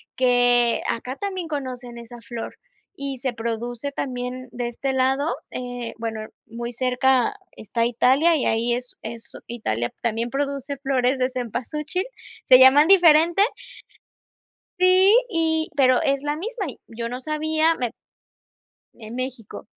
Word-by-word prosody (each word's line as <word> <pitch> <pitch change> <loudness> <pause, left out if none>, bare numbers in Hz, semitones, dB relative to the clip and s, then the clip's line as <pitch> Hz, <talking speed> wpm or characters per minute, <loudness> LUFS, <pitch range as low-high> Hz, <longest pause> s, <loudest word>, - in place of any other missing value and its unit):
que 245 -1 +3
acá 250 +3 -3
también 375 -4 -4
conocen 255 -4 -5
esa 235 +1 -10
flor 235 0 -7 0.4
y 275 -1 -4
se 260 -1 -2
produce 235 +3 -4
también 255 -1 -4
de 240 0 -3
este 265 +3 -3
lado, 265 0 +1 0.2
eh 245 -2 -5
bueno, 225 -1 -4 0.3
muy 235 +1 -6
cerca 255 - +2 0.2
está 230 +2 -2
Italia 265 +7 +3
y - - -1
ahí 230 +2 +1
es 245 +1 -4
es 230 0 -7
Italia 120 - -2
también 235 0 -1
produce 280 +1 -3
flores 265 -1 +1
de 255 - +2
cempasúchil, 270 - -3 0.4
se 255 - +8
llaman 275 +4 +7
diferente. 340 -1 +6 1.4
Sí, 370 +2 +6 0.2
y 320 -5 0
pero 255 -3 +4
es 275 0 +1
la 295 +1 -2
misma 420 +3 -4
y 255 - -8
yo 230 0 -5
no 250 +2 -5
sabía 315 +2 +1
me 245 -5 -2 1.0
En 225 0 -10
México. 255 -4 -6
255 Hz, 135 wpm, -23 LUFS, 240-295 Hz, 1.4 s, se